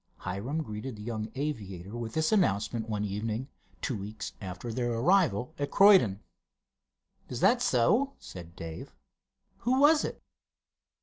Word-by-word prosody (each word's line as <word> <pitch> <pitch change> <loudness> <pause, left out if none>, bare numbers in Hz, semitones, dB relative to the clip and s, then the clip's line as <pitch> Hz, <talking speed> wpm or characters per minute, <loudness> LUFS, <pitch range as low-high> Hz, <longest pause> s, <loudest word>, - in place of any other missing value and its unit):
Hiram 120 - -3
greeted 110 +1 -6
the 105 - -9
young 110 -1 -4
aviator 105 - -4
with 115 -2 -5
this 160 0 +1
announcement 115 - +1
one 105 -1 -1
evening, 110 +6 -3 0.3
two 130 - -1
weeks 105 +2 -6
after 95 +4 -6
their 120 0 -1
arrival 130 - +2
at 145 - -1
Croydon. 190 - +6 1.1
"Is 125 - -4
that 240 +6 +4
so?" 220 - +3
said 85 -2 -11
Dave. 80 -1 -8 0.6
"Who 255 +2 +1
was 300 +2 +6
it?" - - -5
115 Hz, 135 wpm, -29 LUFS, 105-160 Hz, 1.1 s, Croydon